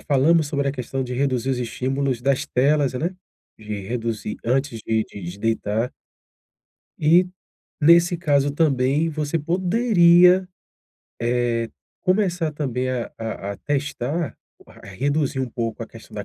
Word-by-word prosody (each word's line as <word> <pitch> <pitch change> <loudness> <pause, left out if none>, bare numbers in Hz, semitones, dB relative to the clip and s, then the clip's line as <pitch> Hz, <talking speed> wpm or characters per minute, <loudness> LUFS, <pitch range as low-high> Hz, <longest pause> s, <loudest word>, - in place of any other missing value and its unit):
falamos 150 +2 +3
sobre 140 -1 -1
a 135 - 0
questão 130 0 -4
de 125 0 -5
reduzir 130 -1 0
os 130 - -1
estímulos 130 +1 -2
das 135 +1 +1
telas, 140 +1 +2
né, 170 +8 -2 0.4
de 105 -1 -6
reduzir 115 -3 -3
antes 125 -1 0
de 110 -1 +1
de 100 - -11
de 90 +3 -7
deitar. 115 +2 -1 1.1
E, 170 +4 +5 0.6
nesse 170 +3 +5
caso 145 -4 +2
também, 145 0 +2
você 155 +1 -2
poderia, 180 0 +4 0.7
eh, 120 -1 0 0.3
começar 180 -4 +1
também 130 -4 -2
a 125 -2 -3
a 110 -3 -4
a - - -9
testar 145 - -2 0.5
reduzir 135 +7 -1
um 130 - -2
pouco 115 -1 -3
a - - -6
questão 115 -1 -14
da 105 - -5
135 Hz, 135 wpm, -22 LUFS, 120-155 Hz, 1.1 s, E